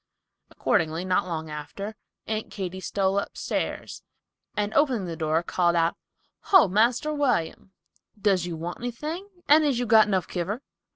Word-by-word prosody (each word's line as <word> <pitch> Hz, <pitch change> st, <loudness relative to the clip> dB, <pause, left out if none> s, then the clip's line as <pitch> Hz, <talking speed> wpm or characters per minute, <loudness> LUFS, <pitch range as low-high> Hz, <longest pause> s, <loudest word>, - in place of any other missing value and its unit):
Accordingly, 160 Hz, +3 st, 0 dB
not 185 Hz, 0 st, +1 dB
long 160 Hz, -2 st, -4 dB
after, 195 Hz, +8 st, -6 dB, 0.3 s
Aunt 215 Hz, 0 st, -3 dB
Katy 190 Hz, -2 st, -5 dB
stole 195 Hz, +1 st, 0 dB
upstairs -, -, -4 dB, 0.6 s
and 210 Hz, 0 st, -1 dB
opening 260 Hz, -9 st, +2 dB
the 170 Hz, -2 st, -4 dB
door 160 Hz, +1 st, 0 dB
called 175 Hz, 0 st, +1 dB
out, 165 Hz, 0 st, +2 dB, 0.5 s
"Ho, 380 Hz, -, +7 dB
Marster 235 Hz, +10 st, +2 dB
William, 250 Hz, -, 0 dB, 0.5 s
does 195 Hz, -4 st, +2 dB
you 170 Hz, -, -4 dB
want 170 Hz, +2 st, -5 dB
anything, 305 Hz, -, -5 dB, 0.2 s
and 305 Hz, +2 st, +7 dB
is 285 Hz, -5 st, +2 dB
you 245 Hz, -, 0 dB
got 220 Hz, -1 st, +6 dB
enough 190 Hz, -4 st, 0 dB
kiver?" 195 Hz, +9 st, -3 dB
195 Hz, 150 wpm, -26 LUFS, 175-240 Hz, 0.6 s, Ho